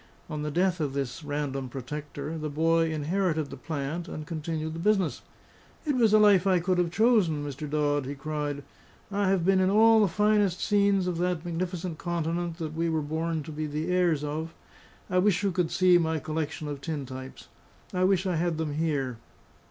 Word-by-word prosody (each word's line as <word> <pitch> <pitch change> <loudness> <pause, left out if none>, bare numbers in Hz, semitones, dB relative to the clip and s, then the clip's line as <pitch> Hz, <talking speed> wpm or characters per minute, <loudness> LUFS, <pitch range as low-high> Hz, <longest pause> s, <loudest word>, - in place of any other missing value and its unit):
On 150 -1 -3
the 150 - -2
death 180 +3 +1
of 145 -3 -1
this 135 +1 -3
random 145 -3 -3
protector, 145 +4 -6
the 155 -1 -3
boy 165 +2 +2
inherited 160 0 -1
the - - -6
plant 150 +5 -4
and 155 -2 -6
continued 160 -1 -4
the 165 - -6
business. 195 -2 +1 0.6
"It 295 -3 +1
was 230 -4 +4
a 215 - +7
life 200 -3 +5
I 185 -2 +4
could 180 +1 +1
have 175 -1 +2
chosen, 185 -7 +2
Mr. 145 +1 -5
Dodd!" 145 -2 0
he 140 - -4
cried. 145 0 -3 0.5
"I 200 -1 +1
have 190 -3 +2
been 190 0 +4
in 185 0 +3
all 220 +2 +6
the 205 - +4
finest 205 -1 +2
scenes 200 -2 +2
of 175 -2 -2
that 180 -2 -1
magnificent 175 -1 -3
continent 170 0 -2
that 160 -3 -4
we 165 +1 0
were 160 -2 0
born 160 +1 -2
to 160 - -8
be 155 0 -3
the 155 +4 -3
heirs 175 -5 +2
of. 155 +2 -4 0.5
I 180 - +2
wish 195 0 +2
you 200 - +2
could 175 -2 0
see 180 -1 +5
my 160 -1 0
collection 155 0 -3
of 145 -2 -5
tin 150 -3 -4
types; 130 0 -9 0.5
I 180 0 +1
wish 190 0 +3
I 180 -3 0
had 170 -1 0
them 160 -2 -2
here. 145 -6 -1
165 Hz, 200 wpm, -28 LUFS, 150-185 Hz, 0.6 s, a